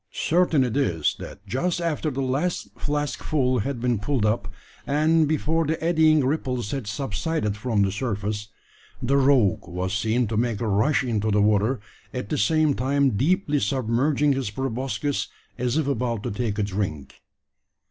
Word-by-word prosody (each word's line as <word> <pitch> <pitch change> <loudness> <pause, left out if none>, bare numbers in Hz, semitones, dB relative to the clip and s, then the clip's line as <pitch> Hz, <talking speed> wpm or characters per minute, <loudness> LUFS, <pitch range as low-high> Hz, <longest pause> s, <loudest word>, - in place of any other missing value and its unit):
Certain 165 -4 +2
it 125 -3 -2
is, 90 - +1
that 100 - -10
just 150 - -1
after 165 -2 -1
the 135 -1 -2
last 140 +7 -1
flask 145 -1 -2
full 130 -5 +1
had 135 +3 -2
been 120 -2 0
pulled 110 +1 0
up, 105 -2 0 0.4
and 155 +2 +3
before 160 +2 +1
the 160 +1 -1
eddying 160 -3 +3
ripples 130 -6 -1
had 135 -6 -4
subsided 105 +1 -2
from 105 -1 0
the 95 - +1
surface, 105 -1 -3 0.5
the 130 +3 +1
rogue 130 -10 +3
was 90 +2 -3
seen 110 +4 +1
to 110 +1 -3
make 115 -1 0
a 115 - -2
rush 110 +9 +2
into 110 -4 0
the 105 0 +2
water, 105 +4 +2 0.4
at 125 -5 -4
the - - -1
same 155 +7 +3
time 135 +2 +1
deeply 150 - +1
submerging 130 +6 +1
his 135 -5 -2
proboscis, 135 +4 -2 0.3
as 125 +3 0
if 160 - +1
about 120 -5 -1
to - - -3
take 105 0 -2
a 105 - +1
drink. 95 -8 -4
125 Hz, 170 wpm, -24 LUFS, 105-145 Hz, 0.5 s, and